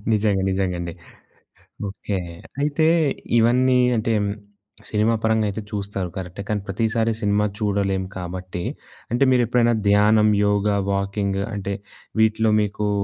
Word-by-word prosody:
నిజంగా. 105 -2 +2
నిజంగా 95 -1 0
అండి. 85 -1 -4 1.0
ఓకే. 100 0 -4 0.4
అయితే 150 +2 +2 0.5
ఇవన్నీ 125 +3 +4 0.2
అంటే, 115 +1 0 0.8
సినిమా 110 +2 +2
పరంగా 110 -1 +2
అయితే 105 +2 -4
చూస్తారు 100 -3 -3
కరెక్టే. 95 +1 -6
కానీ 105 -1 0
ప్రతిసారి 115 +3 0
సినిమా 105 0 +2
చూడలేం 100 -3 0
కాబట్టి, 90 0 -5 0.5
అంటే 120 - +1
మీరెప్పుడైనా 120 -1 +3
ధ్యానం, 105 +1 +5 0.2
యోగ, 105 0 +1 0.2
వాకింగ్, 100 0 -1
అంటే, 100 0 -3 0.5
వీటిలో 110 0 +3
మీకూ 105 0 -1
105 Hz, 115 wpm, -22 LUFS, 100-110 Hz, 1.0 s, ధ్యానం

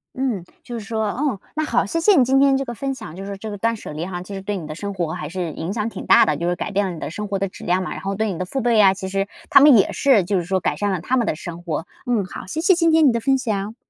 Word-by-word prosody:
嗯， 255 -8 -1 0.2
就 240 -1 -6
是 210 - -9
说 220 +1 -2
哦， 260 -3 -1 0.2
那 310 - 0
好， 305 - +1
谢 330 - -1
谢 405 +4 +5
你 260 - +6
今 265 +2 +3
天 275 -1 +4
这 275 - -2
个 240 - -5
分 270 +3 -3
享， 155 - -9
就 195 - -7
是 200 0 -6
这 215 +2 -7
个 205 - -5
断 230 +3 0
舍 210 - -9
离 155 +3 -4
哈， 180 -1 -5
其 200 - -9
实 195 - -5
对 200 +1 -3
你 165 - -7
的 155 - -6
生 200 +5 -5
活 170 -4 -2
还 180 - -5
是 175 -1 -3
影 165 +6 -4
响 215 0 -2
挺 - - -7
大 - - +7
的， 150 - +1
就 170 +3 -1
是 175 - 0
改 205 - -4
变 200 0 +1
了 - - -3
你 160 - -8
的 - - -5
生 210 +3 -5
活 200 -1 -1
的 195 +1 -1
质 185 - -12
量 180 +1 +1
嘛。 - - -5
然 - - -6
后 195 +1 -3
对 215 +1 -1
你 175 - -5
的 185 - -2
父 270 +8 -3
辈 240 0 +2
呀， 195 -3 +6
其 190 0 -6
实 195 +1 -1 0.2
他 - - +9
们 285 -4 +8
也 195 - +3
是， 260 -9 +3
就 195 +2 0
是 175 - -1
说 190 +1 0
改 150 - -1
善 205 +6 -1
了 185 - -1
他 250 +10 -1
们 240 -4 +1
的 - - 0
生 175 0 -8
活。 165 -2 -3 0.2
嗯， 225 -5 +1
好， 185 - -8
谢 310 - -4
谢 370 +3 +5
今 335 -1 +3
天 315 -2 +5
你 - - +5
的 235 - 0
分 270 +3 +2
享。 215 -3 -3
200 Hz, 370 characters per minute, -21 LUFS, 185-245 Hz, 0.2 s, 他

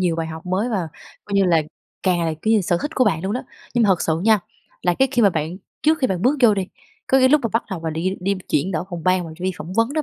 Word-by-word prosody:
nhiều 175 -3 +1
bài 165 -1 -2
học 160 +2 -8
mới, 190 +6 0
và 190 -8 -2 0.4
coi 200 - -5
như 195 - +4
là 165 -3 +3 0.4
càng 180 -2 +2
là, 160 -1 -1
kiểu 220 +1 +3
như, 215 - +4
sở 175 -1 0
thích 295 - -2
của 255 - +3
bạn 175 -6 +1
luôn 195 - -2
đó. 250 - -2 0.3
Nhưng 240 - +3
mà - - +3
thật 185 -3 +3
sự 160 0 0
nha 220 -1 +5 0.4
là 175 -1 +2
cái 265 +6 +2
khi 240 - +3
mà 200 - +6
bạn 160 +1 -3 0.3
trước 315 +1 +3
khi 260 - +2
bạn 185 -3 -2
bước 275 +4 +3
vô 225 -3 +6
đi, 195 -2 -2 0.4
có 265 - +4
nghĩa 260 0 +5
lúc 300 +2 +5
mà 230 - +2
bắt 230 - +2
đầu 190 -4 -4
mà 160 0 -3
đi 175 +5 -2
đi 195 +2 0
chuyển 150 +7 +1
đổi 160 +2 -2
phòng 175 -2 -5
ban 185 -1 +2
và - - -8
đi 185 +1 -1
phỏng 170 +2 -7
vấn 230 +5 +1
đó 310 0 0
190 Hz, 310 wpm, -21 LUFS, 170-225 Hz, 0.4 s, mà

